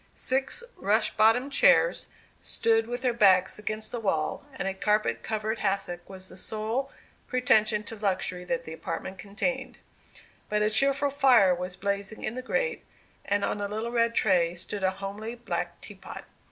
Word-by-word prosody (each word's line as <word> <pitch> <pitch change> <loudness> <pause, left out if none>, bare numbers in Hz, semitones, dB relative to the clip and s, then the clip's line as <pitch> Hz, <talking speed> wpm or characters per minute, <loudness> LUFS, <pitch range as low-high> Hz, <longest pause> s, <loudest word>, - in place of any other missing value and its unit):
Six 265 - 0
rush 215 +3 +2
bottomed 225 +6 +4
chairs - - +4 0.3
stood 225 0 +1
with 245 +2 -4
their 250 -2 +2
backs 190 -4 +4
against 215 0 -4
the 240 - -3
wall, 195 - -1
and 195 - -3
a 195 - -1
carpet 210 - +1
covered 220 +1 -2
hassock 195 -3 -2
was 190 -1 -10
the 185 - -12
sole 225 +7 -3 0.4
pretension 220 -4 +2
to 220 +2 -7
luxury 185 -3 -1
that 255 +5 -2
the 160 - -8
apartment 180 +3 -5
contained. 240 +6 -3 0.7
But 210 0 +1
a 210 - +2
cheerful 275 +5 +3
fire 255 -9 +5
was 180 +1 -4
blazing 200 +1 -3
in 215 - -2
the 255 - -5
grate, 470 - -1 0.4
and 200 0 +1
on 205 - -2
a 205 - -1
little 220 +3 -4
red 230 -1 +1
tray 175 -4 +3
stood 195 +3 -5
a 190 - +4
homely 200 +4 -6
black 240 - -4
teapot. - - -9
215 Hz, 165 wpm, -27 LUFS, 195-240 Hz, 0.7 s, fire